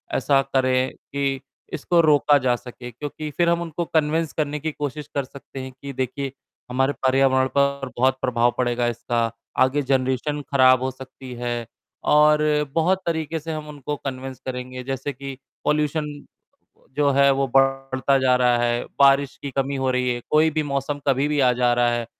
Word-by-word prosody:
ऐसा 135 +1 +3
करें 130 -1 +2
कि 135 -1 -3 0.3
इसको 170 +3 +2
रोका 145 -2 +4
जा 130 -2 +1
सके 125 0 -10
क्योंकि 150 +4 -6
फिर 170 -1 +3
हम 170 0 +1
उनको 170 0 -3
कन्विन्स 160 0 0
करने 150 -1 -2
की 160 +2 -3
कोशिश 145 0 -5
कर 140 - +1
सकते 135 0 -11
हैं 130 - -7
कि 140 +2 -9
देखिए, 130 +1 -3 0.4
हमारे 135 +3 +1
पर्यावरण 130 0 +3
पर 140 -1 +1
बहुत 130 +1 +2
प्रभाव 120 -1 +2
पड़ेगा 120 -1 0
इसका, 115 -1 -1 0.3
आगे 130 +3 +3
जनरेशन 130 +2 0
ख़राब 130 -1 +6
हो 130 - -1
सकती 130 0 -11
है 120 -1 -3 0.5
और 150 0 +5 0.3
बहुत 185 +3 +2
तरीके 160 -1 -2
से 160 +2 -6
हम 155 -1 -6
उनको 145 0 -5
कन्विन्स 130 -2 -6
करेंगे 125 0 -5
जैसे 135 +2 -4
कि 135 -1 -8 0.3
पॉल्यूशन 150 0 +1 0.9
जो 145 -1 +3
है 140 0 +4
वो 135 0 +1
बढ़ता 135 0 +2
जा 130 -1 +3
रहा 125 -1 +3
है। 120 0 0 0.2
बारिश 140 0 +4
की 140 - -4
कमी 135 +1 -1
हो 130 -1 0
रही 125 0 0
है, 120 - -5
कोई 155 +1 +4
भी 155 0 0
मौसम 140 0 -2
कभी 140 +1 +2
भी 150 -1 0
आ 125 -2 +5
जा 125 0 +2
रहा 120 0 +3
है, 120 -1 -1
135 Hz, 180 wpm, -23 LUFS, 130-145 Hz, 0.9 s, ख़राब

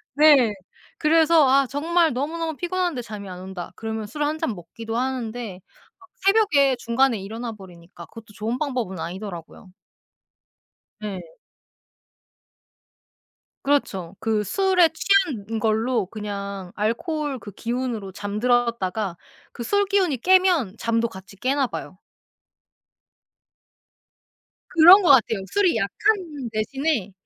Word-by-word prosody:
네. 285 -7 +6 0.5
그래서 320 -1 +4
아 275 0 +4
정말 325 +3 +1
너무너무 320 +5 -3
피곤한데 350 -3 -2
잠이 210 -3 -8
안 180 -1 -8
온다 185 -1 -7
그러면 220 -1 -5
술 295 +8 -4
1 300 +1 -1
잔 230 - -2
먹기도 225 +6 -7
하는데 240 -6 -3 0.4
막 375 -1 -20 0.2
새벽에 350 -11 +4
중간에 240 0 +1
일어나 225 +5 -6
버리니까 175 -4 -13
그것도 225 +3 -14
좋은 220 +4 -3
방법은 250 - -3
아니더라고요. 180 +1 -8 1.3
네. 205 -3 -5 2.4
그렇죠. 195 -11 0
그 220 -2 0
술에 370 - +3
취한 290 - +1
걸로 225 +1 +1
그냥 200 -2 -6
알코올 275 - -2
그 205 - -10
기운으로 235 -2 -4
잠들었다가 210 -2 -1 0.4
그 235 - -6
술 405 - +1
기운이 380 -8 +1
깨면 360 - +3
잠도 230 0 0
같이 195 -1 -13
깨나 270 +4 0
봐요. 185 - -7 2.8
그런 350 +5 +9
것 360 - +2
같아요. 230 -6 +5
술이 400 -4 +2
약한 300 - -1
대신에 230 - -1
235 Hz, 250 characters per minute, -23 LUFS, 205-305 Hz, 2.8 s, 그런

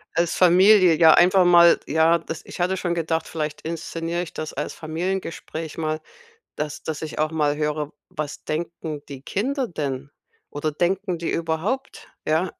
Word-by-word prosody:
Als 170 -1 +1
Familie 185 0 +6
ja 160 -1 +7
einfach 185 +1 +5
mal, 170 -1 +7
ja, 160 +2 +3
das 160 0 -7
ich - - -10
hatte 185 +2 +1
schon 175 -1 -1
gedacht, 165 -1 -1
vielleicht 155 -2 -4
inszeniere 165 +1 -3
ich 175 - -6
das 155 - -6
als - - -4
Familiengespräch 165 -1 -4
mal, 155 0 -2 0.5
dass 150 0 -4
dass 155 -2 -4
ich 155 - -6
auch 155 +1 +1
mal 150 -2 +1
höre: 150 -1 -2 0.2
„Was 150 -1 -6
denken 160 -2 -4
die 135 -2 -9
Kinder 255 - -1
denn? 140 -3 -4 0.4
Oder 150 +1 -2
denken 180 +4 -1
die 170 - -2
überhaupt“, 170 +12 -3 0.2
ja? 160 +3 +1
165 Hz, 160 wpm, -23 LUFS, 155-175 Hz, 0.5 s, ja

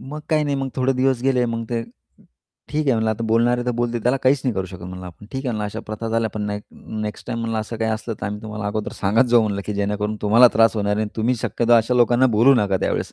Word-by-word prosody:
मग 150 +3 -7
काही 155 -1 +3
नाही. 145 -1 -1
मग 135 -1 -2
थोडे 130 +1 +2
दिवस 130 -1 +1
गेले. 130 -2 +2
मग 115 0 -3
ते 115 -1 -1 0.9
ठीक 150 0 -1
आहे 135 - +4
म्हणलं, 110 -1 +1
आता 110 +1 -3
बोलणारे 120 +2 +2
तर - - +2
बोलतील. 120 -1 -1
त्याला 125 +2 +2
काहीच 130 +1 +3
नाही 125 -4 0
करू 95 -1 -2
शकत 90 -1 -10
म्हणलं 90 +1 -8
आपण. 90 +3 -12
ठीक 130 - -3
आहे 130 - -1
म्हणलं, 110 -2 -2
"अशा 105 - -5
प्रथा 110 +1 -5
झाल्या, 115 0 0
पण 105 - -5
ना 105 - -2 0.5
नेक्स्ट 105 -1 -6
टाईम," 120 -2 -3
म्हणलं, 115 -1 -2
"असं 110 +2 -6
काही 110 0 -1
असलं, 110 +1 -3
तर - - -2
आम्ही 105 +2 -5
तुम्हाला 105 -1 -5
अगोदर" 105 +1 -3
"सांगत 105 +6 +2
जाऊ." 120 -1 +6
म्हणलं, 100 -2 -1
की 105 - -3
"जेणेकरून 105 +1 -1
तुम्हाला 115 +4 +6
त्रास 115 +1 +4
होणार 105 -1 0
आहे 110 - 0
आणि 105 - -4
तुम्ही 115 +3 +1
शक्यतो 120 0 0
अशा 115 +1 +4
लोकांना 120 +1 +4
बोलवू 130 +5 +6
नका 100 -5 +2
त्यावेळेस." - - -2
115 Hz, 265 wpm, -21 LUFS, 105-125 Hz, 0.9 s, जाऊ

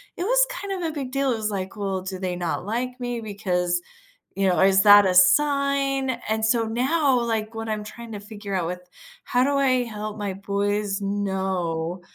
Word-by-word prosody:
it 350 - -3
was - - +4
kind 390 -6 -4
of - - 0
a - - -11
big 270 -4 -5
deal, 275 -1 +1
it - - -3
was, 215 -1 -2
like, 190 0 -4
"Well, 195 -3 -2
do 190 -1 -5
they 180 -1 -2
not 175 +1 -3
like 250 +3 -3
me 245 -1 -3
because, 180 -4 -1 0.6
you 195 -1 +2
know 180 - +2
is 195 0 +5
that 205 -1 +8
a 180 - +1
sign?" 275 +5 +3 0.2
And 220 0 +1
so, 230 0 +2
now, 260 +3 +1
like, 225 -1 -2
what 225 0 -5
I'm 210 -1 -2
trying 230 +2 -10
to 205 - -6
figure 205 -1 -8
out 170 -3 -1
with 180 0 -5 0.4
how 250 +1 +1
do 280 +1 +1
I 255 -2 +2
help 215 -1 -6
my 200 -2 -3
boys 200 +1 -2
know 190 -4 -2
210 Hz, 205 wpm, -24 LUFS, 190-255 Hz, 0.6 s, that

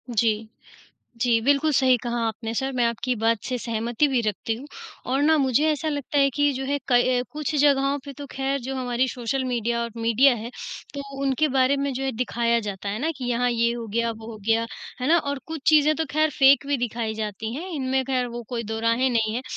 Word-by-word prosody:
जी। 220 0 +1 0.7
जी, 235 -2 +3
बिल्कुल 285 +2 +3
सही 260 -2 +5
कहा 240 0 -2
आपने 225 0 -4
सर, 265 +3 -1
मैं 250 -2 +1
आपकी 235 +2 -1
बात 225 0 +3
से 255 - -2
सहमति 230 +4 0
भी 260 -3 +1
रखती 215 +2 -1
हूँ 265 +5 -10 0.5
और 270 +2 +2
ना 315 +2 +5
मुझे 270 +1 +2
ऐसा 310 +1 -1
लगता 290 -1 -2
है 275 0 +5
कि 290 0 +3
जो 265 0 -4
है 285 +2 -1
क 245 0 +3
कुछ 300 -1 -3
जगहों 280 -1 +3
पे 280 - -7
तो 285 - -6
ख़ैर 270 +1 -1
जो 265 +2 -5
हमारी 250 0 0
सोशल 255 +2 -2
मीडिया 235 -2 -1
और 235 - -4
मीडिया 230 +4 +4
है, 230 +1 -6 0.4
तो 280 - -4 0.2
उनके 275 +3 +2
बारे 265 0 +3
में 280 0 -1
जो 260 +1 -4
है 265 - -1
दिखाया 235 0 0
जाता 205 -2 -5
है 205 +2 -2
ना 315 +4 0
कि 260 - -6
यहाँ 245 +1 +1
ये 235 0 +1
हो 235 -1 -5
गया, 230 +2 0
वो 220 -1 -9
हो 225 - -8
गया, 225 0 +2 0.3
है 255 - -1
ना? 340 +2 +6
और 285 -3 -2
कुछ 320 -1 -5
चीज़ें 305 -1 +5
तो 320 - 0
ख़ैर 310 +1 +2
फेक 275 +1 +6
भी 285 0 +1
दिखाई 230 -2 -2
जाती 220 +1 -4
हैं 335 +7 -5
इनमें, 265 -4 0
ख़ैर 255 -1 0
वो 240 0 -6
कोई 240 -2 -3
दोराहें 230 +4 +1
नहीं 220 -2 +1
है। 245 - -2
250 Hz, 225 wpm, -24 LUFS, 230-275 Hz, 0.7 s, ना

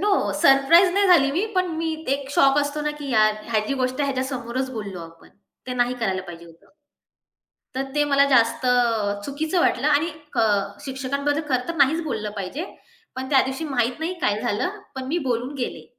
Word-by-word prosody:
No. 415 +2 +1 0.3
Surprise 335 +5 +6
नाही 400 0 +3
झाली 335 -7 +5
मी, 360 +7 0
पण 370 0 +2
मी 325 0 -1 0.2
एक 275 -1 -6
शॉक 275 +1 +4
असतो 290 +1 -1
ना, 300 - 0
की 290 -1 -6
यार 215 -2 +4 0.2
ह्याची 215 +4 0
गोष्ट 255 +2 -1
आहे 280 -1 +1
ह्याच्या 260 0 -1
समोरच 250 +2 -4
बोललो 200 -6 -6
आपण. 165 0 -16 0.4
ते 250 - -4
नाही 245 0 +1
करायला 190 -4 -1
पाहिजे 170 -2 -10
होतं. 165 - -20 1.0
तर 265 - -1
ते 295 - +3
मला 280 -1 +4
जास्त 230 -1 +3
अ, 225 -5 +1
चुकीचं 310 +5 -1
वाटलं 275 - +1
आणि 300 +3 +2 0.2
क - - -3 0.4
शिक्षकांबद्दल 280 +2 -2
खरं 255 -2 0
तर 335 - -2
नाहीच 300 +4 +3
बोललं 215 -8 -3
पाहिजे. 200 - -4 0.5
पण 260 0 -4
त्यादिवशी 265 +2 +2
माहीत 250 -4 -1
नाही 325 +3 -2
काय 210 -6 0
झालं, 305 - -2 0.2
पण 260 -1 -5
मी 315 +6 -1
बोलून 250 +2 -1
गेले. 255 -3 -5
265 Hz, 190 wpm, -23 LUFS, 235-295 Hz, 1.0 s, Surprise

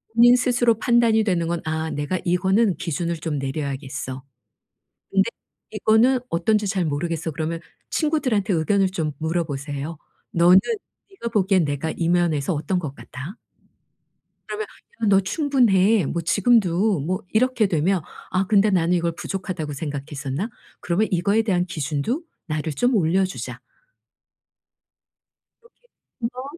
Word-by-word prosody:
본인 240 +1 +7
스스로 240 -3 +2
판단이 230 -2 +3
되는 175 -5 0
건 170 0 -2
‘아. 160 0 -2
내가 145 +5 -2
이거는 190 +3 +2
기준을 170 +1 -2
좀 155 -1 -3
내려야겠어. 135 -1 -4 0.9
근데 - - +3 0.4
이거는 240 +4 +3
어떤지 205 +5 +1
잘 190 -3 0
모르겠어.' 160 +2 -2
그러면 160 +2 -3 0.3
친구들한테 255 - +1
의견을 190 +4 +2
좀 160 -5 -2
물어 165 +2 0
보세요. 145 +2 -5 0.3
"너는 175 +2 +6 0.5
네가 310 -12 -5
보기엔 190 -4 +3
내가 145 +2 -2
이 165 -1 -1
면에서 175 -3 +1
어떤 155 +4 -1
것 150 -6 -6
같아?" 145 - -9 1.1
그러면 435 +1 -4 0.4
"야. - - +3
너 195 -1 +5
충분해. 220 - +3
뭐 170 +4 -2
지금도." 200 -1 +3
뭐 185 +8 -2
이렇게 240 0 +3
되면 180 +1 +1 0.3
'아. 185 +1 +1
근데 210 +1 +4
나는 175 -2 +2
이걸 170 -1 +1
부족하다고 170 -3 -4
생각했었나? 145 - -4 0.3
그러면 190 +5 0
이거에 200 +5 +2
대한 185 -5 +1
기준도 165 - -2 0.2
나를 155 -1 -2
좀 245 - +1
올려주자.' 185 0 0 2.0
이렇게 470 +1 -22 0.5
한번 250 +2 -4
180 Hz, 300 characters per minute, -23 LUFS, 160-215 Hz, 2.0 s, 본인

